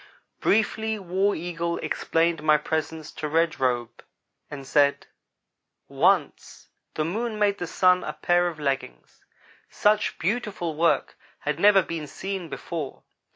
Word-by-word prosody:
Briefly 220 +1 +1
War 195 +1 0
Eagle 170 0 -3
explained 165 -1 0
my 155 0 +4
presence 160 0 -3
to 155 - -5
Red 165 +2 +1
Robe 120 -2 -1 0.5
and 140 -2 -8
said: 140 +1 +2 0.8
"Once - - 0 0.3
the 155 - 0
Moon 220 +6 -2
made 205 -1 +1
the 175 - -3
Sun 180 +1 +3
a - - -4
pair 175 0 +2
of 165 -3 -5
leggings. 135 - -4 0.5
Such 210 +1 +1
beautiful 195 -3 -2
work 165 +2 +1 0.2
had 150 +1 -2
never 200 0 +6
been 160 -3 -5
seen 190 +1 -5
before. 155 -1 -6
170 Hz, 130 wpm, -25 LUFS, 150-195 Hz, 0.8 s, never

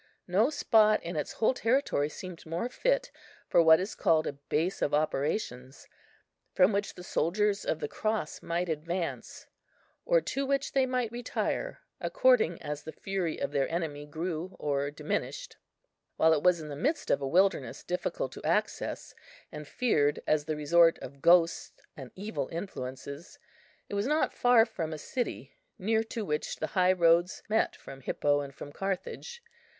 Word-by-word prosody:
No 200 +8 +3
spot 215 -7 +4
in 170 0 -5
its 150 - -3
whole 225 - +2
territory 230 - +1
seemed 180 +1 -9
more 170 +9 -3
fit - - 0 0.4
for - - +5
what 160 -1 +7
is 190 +3 -3
called 160 -1 +2
a - - -2
base 150 +5 -2
of 145 - +2
operations, 140 - -2 0.7
from 185 +2 +5
which 200 0 -1
the 180 - -10
soldiers 200 +5 0
of 160 - -1
the - - -2
Cross 215 -7 -2
might 175 +2 -2
advance, 170 +2 -4 0.6
or - - +4
to 275 - -2
which 275 0 0
they 265 -1 +2
might 250 -3 -1
retire, 250 - -3 0.2
according - - +3
as 150 0 -4
the 160 - -8
fury 190 -4 -3
of - - -2
their 140 -2 0
enemy 150 -4 -3
grew 165 +3 -4
or 140 -1 -1
diminished. - - -4 0.6
While 160 0 +5
it 150 - +1
was 180 0 +4
in 155 -1 -7
the 145 - -5
midst 290 - -1
of 140 - +2
a 135 - -1
wilderness 170 -6 +1
difficult 180 - -3
of - - -10
access, - - -1 0.4
and 150 -1 -8
feared 145 -13 +1
as 150 -1 +1
the 155 0 -2
resort 165 +3 +4
of 140 +2 -10
ghosts 170 0 +4 0.2
and 135 -3 -9
evil 210 +4 -4
influences, 140 -4 -6 0.5
it - - -9
was 200 +3 0
not 305 +2 +1
far 245 -2 +5
from 160 -8 -4
a - - -5
city 245 - -4 0.2
near 220 +2 +1
to 225 -1 -4
which 150 -3 -2
the - - -3
high 185 -1 +4
roads 175 0 +3
met 220 +1 +1
from 135 0 -11
Hippo 145 +2 +1
and 140 -1 -8
from 145 - -9
Carthage. 195 - -5
175 Hz, 165 wpm, -29 LUFS, 150-220 Hz, 0.7 s, what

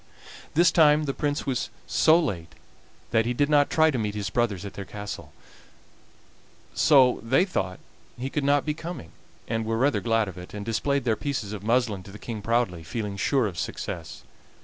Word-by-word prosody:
This 170 +2 +5
time 155 -2 +5
the 135 - -1
Prince 145 0 -2
was 130 -3 -1 0.2
so 160 +1 +4
late 95 - -3 0.6
that 115 0 +2
he 120 - -1
did 145 +4 +1
not 145 -1 +4
try 160 0 +4
to 130 - -2
meet 105 -1 -2
his 100 -3 -3
brothers 105 -6 0
at 100 - -7
their 100 - -6
castle, 105 +1 -7 1.4
so 135 -5 +5
they 130 +10 +3
thought 95 - -2 0.4
he 130 +3 -4
could 150 - -1
not 145 0 +3
be 150 - 0
coming, 160 - -7 0.4
and 115 0 -1
were 115 0 -1
rather 130 -4 +2
glad 115 +1 +1
of 90 -1 -8
it, 90 +3 -10
and 100 -1 -5
displayed 140 +5 0
their 115 -3 +1
pieces 110 -2 -3
of 105 - -6
muslin 115 -2 +1
to 95 - -12
the 105 - -10
King 110 -1 -6
proudly, 115 -6 0
feeling 105 +3 -4
sure 130 +5 +1
of 90 -5 -4
success. - - -5
115 Hz, 195 wpm, -26 LUFS, 105-145 Hz, 1.4 s, This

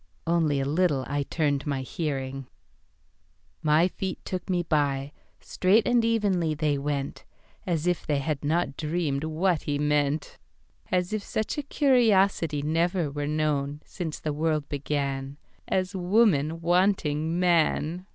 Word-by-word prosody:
(Only 165 -4 +2
a 135 - -1
little 150 -2 +1
I 145 +1 -1
turned 145 -1 -1
my 135 -2 -1 1.7
hearing.)My 155 - +3
feet 190 0 -4
took 185 -1 -5
me 175 -1 +1
by; 145 -3 0 0.3
Straight 200 +4 +2
and 240 -1 +3
evenly 200 -8 +1
they 145 -2 0
went:As 150 +3 -4
if 180 -1 0
they 150 -2 +1
had 150 +1 -2
not 155 -1 0
dreamed 155 -2 -1
what 160 +1 0
he 145 -1 -2
meant:As 150 +5 -2
if 215 - -1
such 220 +7 -3
a - - 0
curiosityNever 180 - +2
were 145 0 -3
known 150 -2 -1
since 165 -5 -5
the 150 - -3
world 155 -1 0
beganAs 145 +6 -3
woman 175 -5 +2
wanting 170 -3 +1
man! 175 0 +1
155 Hz, 120 wpm, -26 LUFS, 145-180 Hz, 1.7 s, hearing.)My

